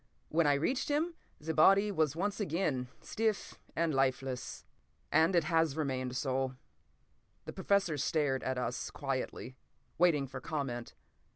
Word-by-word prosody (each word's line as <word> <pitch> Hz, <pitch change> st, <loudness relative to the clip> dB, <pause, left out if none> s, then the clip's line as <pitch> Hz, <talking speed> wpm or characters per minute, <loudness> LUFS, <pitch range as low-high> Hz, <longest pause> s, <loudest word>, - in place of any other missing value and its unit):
When 160 Hz, -1 st, +3 dB
I 145 Hz, -, +5 dB
reached 250 Hz, -, 0 dB
him, 315 Hz, +4 st, +1 dB, 0.3 s
the 160 Hz, +2 st, -3 dB
body 195 Hz, +6 st, +5 dB
was 155 Hz, -5 st, +1 dB
once 200 Hz, +5 st, -1 dB
again 155 Hz, -9 st, -1 dB
stiff 220 Hz, -2 st, -2 dB, 0.2 s
and 165 Hz, -1 st, +1 dB
lifeless. 130 Hz, -1 st, -1 dB, 0.5 s
And—it 170 Hz, +1 st, +4 dB
has 160 Hz, -2 st, +1 dB
remained 130 Hz, -4 st, -2 dB
so." 130 Hz, -1 st, -1 dB, 0.9 s
The -, -, -6 dB
Professor 195 Hz, -6 st, +1 dB
stared 145 Hz, -2 st, +1 dB
at 130 Hz, 0 st, -2 dB
us 125 Hz, -1 st, -2 dB
quietly, 130 Hz, -1 st, -4 dB, 0.4 s
waiting 165 Hz, -5 st, +4 dB
for 130 Hz, -1 st, -8 dB
comment. 125 Hz, -5 st, -4 dB
150 Hz, 130 wpm, -33 LUFS, 130-170 Hz, 0.9 s, I